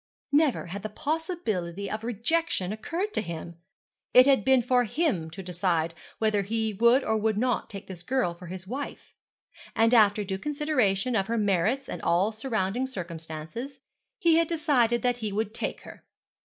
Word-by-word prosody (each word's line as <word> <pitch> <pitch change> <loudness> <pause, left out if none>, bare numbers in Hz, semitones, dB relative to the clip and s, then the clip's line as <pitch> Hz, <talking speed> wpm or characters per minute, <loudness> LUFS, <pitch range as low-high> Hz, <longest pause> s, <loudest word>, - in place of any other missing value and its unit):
Never 290 -2 +3
had 185 +3 -6
the 215 - -4
possibility 220 - -2
of 215 +2 -4
rejection 230 - 0
occurred 345 - -3
to - - +1
him. 170 0 -7 0.6
It 250 0 +9
had 270 -6 +4
been 265 0 +4
for 250 +1 +3
him 225 - 0
to 190 +4 -8
decide 175 -2 0 0.2
whether 215 -2 +2
he 220 +2 -1
would 235 +6 +4
or 220 - +1
would 215 -1 0
not 245 +1 0
take 200 -2 -8
this 185 -3 -9
girl 220 -1 0
for 175 +1 -12
his 185 +1 -7
wife; 265 +8 -6 0.6
and 225 +2 +4
after 210 -2 +5
due 190 -1 -4
consideration 255 -6 0
of 195 -3 +1
her 230 +1 -1
merits 210 +6 +1
and - - -6
all 185 +5 +2
surrounding 225 +1 -1
circumstances, 170 - -7 0.4
he 335 -6 +4
had 335 -1 +3
decided 255 -8 +2
that 245 -1 +2
he 220 -3 -3
would 215 +1 -2
take - - -3
her. - - -12
220 Hz, 170 wpm, -27 LUFS, 190-260 Hz, 0.6 s, It